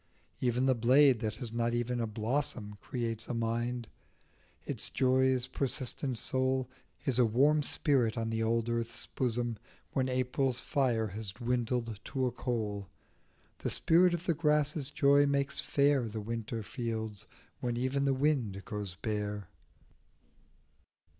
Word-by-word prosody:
Even 125 +1 +1
the 130 - +4
blade 130 +2 +5
that 110 -1 -2
has 115 0 -6
not 120 0 0
even 120 +1 -1
a 115 - 0
blossom 110 -1 -2
Creates 115 -3 -2
a 120 - -3
mind, 120 +1 -1 0.8
its - - -1
joy's 130 -1 +2
persistent 130 0 -2
soul 130 +1 0 0.4
Is 130 -3 +1
a 125 - +6
warm 145 +7 +4
spirit 130 -6 +1
on 115 0 -1
the 115 0 -1
old 115 +1 +1
earth's 115 0 -2
bosom 120 -2 -1 0.3
When 130 -1 0
April's 130 0 0
fire 125 -5 +1
has 100 0 -6
dwindled 120 -1 -1
to 130 -1 -1
a 125 - 0
coal; 110 -6 -3 0.7
The - - -2
spirit 175 +2 +4
of 170 +1 -7
the 170 - +2
grasses' 150 -2 +2
joy 140 0 +4
makes 140 0 +1
fair 140 -3 +2
The 110 +1 -5
winter 115 +1 -4
fields 110 -3 -4 0.3
when 120 -1 -2
even 130 +3 0
the 135 -1 +2
wind 130 - 0
goes 105 -4 -5
bare. 105 -2 -3
120 Hz, 140 wpm, -32 LUFS, 115-135 Hz, 0.8 s, a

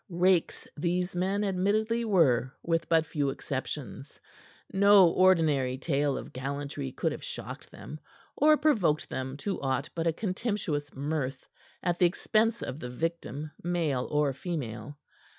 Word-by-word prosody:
Rakes 180 0 +1
these 180 +3 -1
men 190 +3 0
admittedly 210 +4 +1
were 140 - +3
with 165 -1 0
but 160 -1 +4
few 145 -3 -1
exceptions. 135 -1 -5 0.5
No 200 -1 +7
ordinary 160 -9 +3
tale 140 -1 0
of - - -8
gallantry 140 - -4
could - - -1
have - - -7
shocked - - -7
them, 155 - -9 0.4
or 305 +1 +5
provoked 215 - +2
them 130 +1 -4
to 200 -2 -2
aught 135 0 -1
but 165 0 -1
a 165 - +2
contemptuous 185 -7 -2
mirth 140 -2 -3 0.4
at 175 -1 0
the 180 - +6
expense 220 +5 +1
of 135 - -5
the 125 - -6
victim, 155 +1 -4
male 165 -7 0
or 150 -2 +1
female. 145 -3 -5
165 Hz, 140 wpm, -29 LUFS, 140-185 Hz, 0.5 s, No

